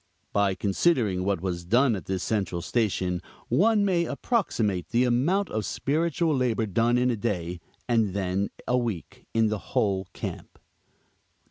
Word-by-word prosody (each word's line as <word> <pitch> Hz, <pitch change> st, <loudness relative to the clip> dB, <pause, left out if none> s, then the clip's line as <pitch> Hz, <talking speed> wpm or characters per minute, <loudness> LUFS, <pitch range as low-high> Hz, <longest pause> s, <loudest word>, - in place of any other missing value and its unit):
By 100 Hz, -2 st, +2 dB
considering 100 Hz, -, +1 dB
what 95 Hz, -3 st, 0 dB
was 90 Hz, -2 st, -3 dB
done 120 Hz, +6 st, +3 dB
at 95 Hz, -, -7 dB
this 95 Hz, -1 st, -2 dB
central 95 Hz, -6 st, -1 dB
station 95 Hz, -5 st, 0 dB, 0.3 s
one 210 Hz, +2 st, +4 dB
may 175 Hz, -3 st, +2 dB
approximate 105 Hz, -, -1 dB
the 120 Hz, +2 st, +3 dB
amount 145 Hz, +12 st, +2 dB
of 110 Hz, 0 st, -1 dB
spiritual 160 Hz, +4 st, 0 dB
labor 120 Hz, -4 st, +1 dB
done 115 Hz, +4 st, +2 dB
in 125 Hz, 0 st, +2 dB
a -, -, 0 dB
day, 90 Hz, -6 st, -2 dB, 0.3 s
and 110 Hz, -5 st, +2 dB
then 95 Hz, 0 st, 0 dB, 0.2 s
a 125 Hz, 0 st, +3 dB
week 110 Hz, -9 st, -5 dB
in 110 Hz, -1 st, +4 dB
the 110 Hz, -1 st, -2 dB
whole 95 Hz, -3 st, 0 dB
camp: -, -, -6 dB
1. -, -, -33 dB
110 Hz, 155 wpm, -26 LUFS, 95-125 Hz, 0.3 s, one